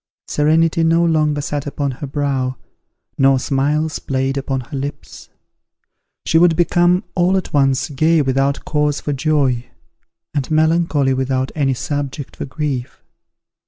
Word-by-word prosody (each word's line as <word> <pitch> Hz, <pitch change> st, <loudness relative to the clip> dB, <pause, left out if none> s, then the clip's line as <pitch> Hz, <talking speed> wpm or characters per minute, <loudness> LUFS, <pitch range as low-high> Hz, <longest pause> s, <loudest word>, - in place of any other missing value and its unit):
Serenity 160 Hz, +2 st, +2 dB
no 165 Hz, +1 st, +3 dB
longer 155 Hz, -3 st, +1 dB
sat 145 Hz, 0 st, -3 dB
upon 140 Hz, -1 st, -2 dB
her 135 Hz, +3 st, -7 dB
brow, 135 Hz, -2 st, -1 dB, 0.6 s
nor 135 Hz, 0 st, +5 dB
smiles 145 Hz, +4 st, 0 dB
played 135 Hz, 0 st, -1 dB
upon 135 Hz, -1 st, -2 dB
her 130 Hz, -, -9 dB
lips. 140 Hz, +1 st, -7 dB, 1.0 s
She 165 Hz, -, +3 dB
would 170 Hz, -1 st, +5 dB
become 175 Hz, +2 st, +3 dB
all 185 Hz, +2 st, +2 dB
at 190 Hz, -, -4 dB
once 135 Hz, -2 st, +2 dB
gay 155 Hz, +2 st, +2 dB
without 135 Hz, +1 st, 0 dB
cause 150 Hz, -1 st, 0 dB
for 145 Hz, -, -3 dB
joy, 135 Hz, -4 st, 0 dB, 0.7 s
and 145 Hz, -3 st, -2 dB
melancholy 155 Hz, -3 st, +2 dB
without 130 Hz, 0 st, -1 dB
any 135 Hz, -4 st, 0 dB
subject 145 Hz, +1 st, -4 dB
for -, -, -5 dB
grief. 135 Hz, -3 st, -4 dB
145 Hz, 135 wpm, -18 LUFS, 135-155 Hz, 1.0 s, nor